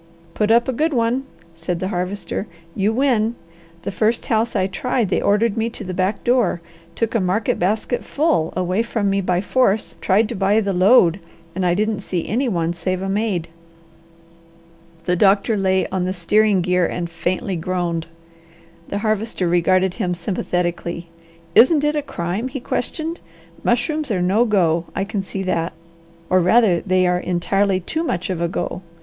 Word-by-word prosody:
"Put 210 -1 0
up 235 +2 +4
a 260 - 0
good 310 +5 0
one!" 240 +3 +1 0.3
said 165 +1 -4
the 185 - -2
Harvester. 195 +2 -3 0.3
"You 200 +4 +1
win. 235 -2 +1 0.5
The - - -3
first 220 +4 0
house 225 +1 0
I 185 - +2
tried 230 +2 -1
they - - +1
ordered 210 +1 +2
me 225 +1 0
to 230 - -8
the 185 -1 -5
back 185 +3 -1
door, 240 -8 +2 0.4
took 230 -1 -1
a 230 - +2
market 190 +3 0
basket 215 +6 0
full 285 - +1
away 185 +3 +1
from 225 -3 -1
me 195 0 +1
by 180 -1 0
force, 215 0 +1
tried 210 +3 +3
to 240 - -4
buy 195 +3 +2
the 200 -2 -1
load, 185 -1 +5 0.3
and 190 - -2
I 175 -1 +2
didn't 215 +1 0
see 180 -4 -3
any 250 +3 0
one 170 -4 0
save 185 +1 -2
a 195 - -2
maid." 195 -4 -1 1.6
The 180 - +2
doctor 200 +4 +3
lay 190 -1 +1
on 185 -1 -1
the 185 - -1
steering 200 +2 +2
gear 180 0 +2
and 175 -1 -3
faintly 185 +4 -2
groaned. 170 -1 -2 0.8
The 200 - -3
Harvester 215 -3 0
regarded 185 +2 +2
him 180 -1 -2
sympathetically. 175 -1 -3 0.4
"Isn't 285 - +6
it 295 0 +1
a 295 - +1
crime?" 190 -2 -3
he 270 +1 -5
questioned. 320 +7 -3 0.4
"Mushrooms 280 +5 0
are 200 -5 0
no 195 +7 +3
go. 170 -6 +2
I 195 - 0
can 200 0 -3
see 190 0 -5
that! 170 -3 -1 0.5
or 185 - +3
rather 185 0 +4
they 185 -1 +2
are 180 0 +2
entirely 185 +2 +1
too 315 - -2
much 185 - -2
of 175 -2 -3
a 170 - +1
go. 170 +1 -4
195 Hz, 175 wpm, -20 LUFS, 180-225 Hz, 1.6 s, Isn't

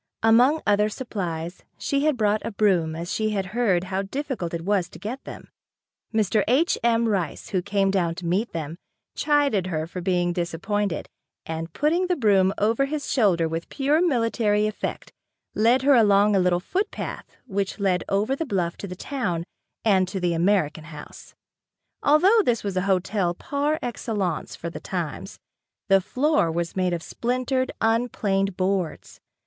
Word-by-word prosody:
Among 245 +8 +5
other 210 +1 +3
supplies 180 -8 -5
she 280 +1 0
had 305 -4 +2
brought 215 -1 +1
a - - -3
broom 185 -7 +1
as 170 +3 -4
she 215 0 0
had 195 - -1
heard 205 -7 +2
how 190 +1 -2
difficult 240 - -4
it 170 0 -5
was 195 -3 +1
to - - -12
get 230 +8 -6
them. - - -10 0.6
Mr. 215 -1 +2
H. 275 +9 +3
M. 235 0 +3
Rice, 195 -6 -2
who 185 -3 0
came 195 0 +1
down 175 -4 0
to 175 - -7
meet 190 +7 0
them, 160 0 -5 0.4
chided 285 - +1
her 160 -3 -2
for 180 +2 -7
being 175 -1 +1
disappointed 175 +2 -2 0.4
and 165 +1 -5
putting 340 +5 +1
the 360 - +1
broom 200 - +3
over 225 +6 +2
his 295 +1 -4
shoulder 185 -10 +3
with 165 +1 -4
pure 290 +4 +1
military 230 -8 +2
effect, 215 0 -4 0.4
led 235 +5 +3
her 285 +1 +5
along 205 -3 +5
the 200 - +3
little 180 -1 +2
footpath 375 - -4
which 195 +1 -3
led 190 -3 +1
over 210 +7 +1
the 325 - -2
bluff 185 - -2
to 200 - -6
the 180 - -7
town, 195 -7 -3 0.4
and 190 -4 +4
to 190 - -4
the 175 -1 0
American 165 -3 +1
House. 150 -2 -11 0.7
Although 370 +10 +5
this 235 - 0
was 200 -2 -3
a 185 - +1
hotel 190 -1 +1
par 290 - -1
excellence 205 -7 -3
for 170 - -6
the - - -7
times, 175 -6 -5 0.5
the 195 0 +5
floor 265 - +1
was 170 0 -3
made 185 -1 +1
of 170 -1 -3
splintered, 255 +2 -1
unplaned 205 -4 0
boards. 185 -3 -2
200 Hz, 165 wpm, -24 LUFS, 175-240 Hz, 0.7 s, Among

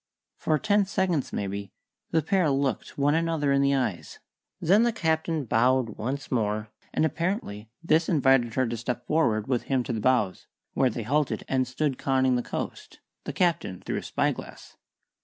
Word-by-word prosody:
For 155 - +1
ten 205 +1 +2
seconds, 185 -7 0
maybe, 100 0 -4 0.4
the 160 -1 +1
pair 185 -1 +2
looked 135 -1 -1
one 145 +1 +3
another 165 -3 +1
in 140 0 +3
the 140 0 +3
eyes; 125 -10 -2 0.4
then 195 +6 +4
the 235 0 +3
Captain 160 -6 -1
bowed 125 +2 +2
once 135 +6 -4
more, 105 -3 -1 0.2
and 155 - +1
apparently 160 - -3
this 160 0 +2
invited 135 -7 +3
her 130 - +2
to 120 0 -3
step 120 +1 -4
forward 120 -9 +1
with 125 -3 -1
him 130 -2 +2
to 120 - -3
the 110 - -2
bows, 120 -7 +1 0.3
where 130 - +3
they 115 0 -4
halted 145 +4 0
and 130 -1 +1
stood 135 +1 -1
conning 130 -1 +2
the 125 - +1
coast, - - -6 0.3
the - - -4
Captain 170 - 0
through - - -4
his - - -5
spyglass. - - -3
135 Hz, 175 wpm, -27 LUFS, 120-160 Hz, 0.4 s, then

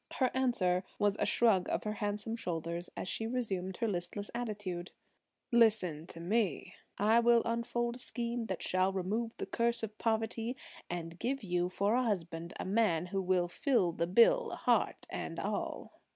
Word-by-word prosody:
Her 260 -2 +1
answer 205 -9 +1
was 205 -1 +2
a - - +2
shrug 205 -6 +3
of - - -1
her 210 - -2
handsome 210 +1 -2
shoulders 170 -3 -3
as - - -4
she 225 +4 -1
resumed 195 -7 -2
her 230 - 0
listless 195 +1 -3
attitude. 205 -7 -4 0.6
"Listen 205 -9 +3
to 170 - -9
me; 195 -1 0 0.2
I 220 +3 +4
will 235 0 +5
unfold 235 +1 -1
a - - -9
scheme 235 -2 -2
that 190 -4 -3
shall 185 +1 +2
remove 210 +5 -2
the - - -3
curse 235 0 +1
of 215 -1 -4
poverty, 225 +2 -1 0.3
and 170 -1 -5
give 270 0 -1
you 180 -2 0
for 200 +3 +1
a 250 - +3
husband 170 -7 -2
a - - -3
man 190 -4 +2
who 195 +2 -2
will 180 -1 +2
fill 235 - +2
the 170 0 -1
bill, 235 - +5
heart - - +1
and - - -4
all." - - -3
205 Hz, 170 wpm, -33 LUFS, 180-235 Hz, 0.6 s, will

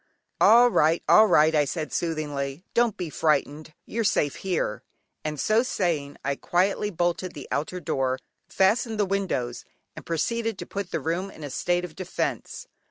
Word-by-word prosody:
"All 240 +2 +7
right, 160 -2 +3
all 215 0 +7
right" 155 -4 +5
I 150 -1 +4
said 155 +2 -4
soothingly: 150 -2 -3
"don't 235 -3 +2
be 175 -4 -4
frightened, 155 0 0
you're 230 +1 -2
safe 145 -8 +1
here," 175 - -2 0.4
and 150 -1 -4
so 215 - +3
saying 165 - -2
I 140 0 -1
quietly 195 +3 +1
bolted 175 0 -1
the 145 - -8
outer 155 +5 -2
door, 130 -5 -1 0.3
fastened 220 +3 +1
the 205 - +3
windows, 185 -12 -2 0.3
and - - -9
proceeded 225 +6 -1
to - - -6
put 200 -2 -5
the - - -2
room 175 +4 -2
in 155 - -12
a 145 - -6
state 175 +5 0
of 160 -3 -11
defence. 190 - -4
175 Hz, 165 wpm, -25 LUFS, 150-195 Hz, 0.4 s, All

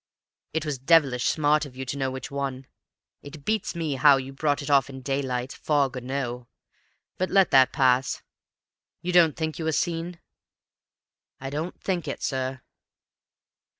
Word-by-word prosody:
"It 160 -1 -2
was 145 -4 -3
devilish 135 -3 +3
smart 150 0 +2
of 140 -4 -9
you 130 - -4
to 130 - -4
know 135 -1 -1
which 130 0 -7
one; 135 -2 -4 0.6
it 145 0 -11
beats 215 -4 -1
me 160 -4 -2
how 140 +1 +6
you 135 0 -6
brought 145 0 0
it 140 - -6
off 140 -2 +4
in 135 -1 -8
daylight, 130 -2 -2
fog 140 -3 0
or 125 - -4
no 125 -1 -3
fog! 120 - -23 0.7
But 185 - 0
let 195 -2 +4
that 130 -1 +6
pass. 130 -2 +2 0.8
You 180 +1 -2
don't 165 -4 +5
think 160 0 -3
you 160 - -3
were 160 - +1
seen?" 170 +2 -2 1.2
"I 135 0 -6
don't 155 +5 -4
think 175 -5 -2
it, 140 - -5
sir." 130 0 -2
140 Hz, 170 wpm, -26 LUFS, 130-160 Hz, 1.2 s, how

